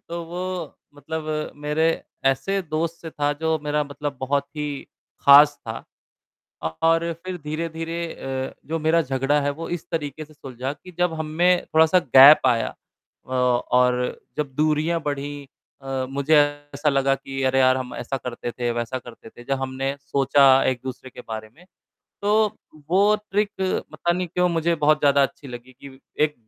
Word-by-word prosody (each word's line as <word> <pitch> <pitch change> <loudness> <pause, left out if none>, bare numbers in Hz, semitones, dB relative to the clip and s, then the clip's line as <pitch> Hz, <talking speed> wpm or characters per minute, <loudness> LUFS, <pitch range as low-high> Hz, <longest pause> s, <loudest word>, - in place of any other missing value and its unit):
तो 170 0 -4
वो 175 +2 -5 0.5
मतलब 155 +1 -4
मेरे 150 +2 +1 0.4
ऐसे 135 +9 +1
दोस्त 165 0 -2
से 165 - -7
था 145 -1 0
जो 160 0 +1
मेरा 150 0 0
मतलब 145 0 -5
बहुत 140 +1 0
ही 150 0 -2 0.5
खास 145 +1 +7
था। 110 0 -5 1.0
और 165 +1 +3
फिर 185 -1 -4
धीरे-धीरे 165 +2 -4
अ, 130 0 -4 0.2
जो 165 +1 -1
मेरा 160 +2 +2
झगड़ा 135 +1 0
है 145 0 0
वो 160 +4 -6
इस - - -25
तरीके 155 -1 -4
से 155 - -19
सुलझा 130 -2 -6
कि 150 +5 -14
जब 175 -1 +2
हम 160 -1 -4
में 180 0 +4
थोड़ा-सा 160 +3 +5
गैप 140 -4 +8
आया 120 -3 +1 0.5
औ 130 - -5 0.4
और 125 0 +2 0.2
जब 145 -3 -3
दूरियाँ 155 +3 +1
बढ़ीं 145 -1 -4 0.4
अ, 135 -1 -3
मुझे 140 +3 +1 0.4
ऐसा 145 +2 0
लगा 135 -1 +2
कि 135 0 -6
अरे 130 0 +2
यार! 130 0 +5
हम 130 -1 -5
ऐसा 135 - -4
करते 125 -2 -5
थे, 120 0 -3
वैसा 120 +2 -3
करते 120 -2 -13
थे। 120 +2 -15
जब 135 -1 0
हमने 135 +1 -3
सोचा 140 0 +2 0.2
एक-दूसरे 130 0 -4
के - - -11
बारे 110 -1 -6
में, 175 - -18 0.6
तो 210 +1 +2 0.3
वो 200 +4 +4 0.2
ट्रिक 205 +1 +1 0.4
पता 175 - 0
नहीं 180 +1 -2
क्यों 180 +2 +1
मुझे 170 0 +1
बहुत 150 -1 +3
ज़्यादा 140 -1 +4
अच्छी 140 +1 -3
लगी 125 +1 -10
कि 135 -1 -12 0.3
एक 150 -1 -2
145 Hz, 170 wpm, -23 LUFS, 135-165 Hz, 1.0 s, गैप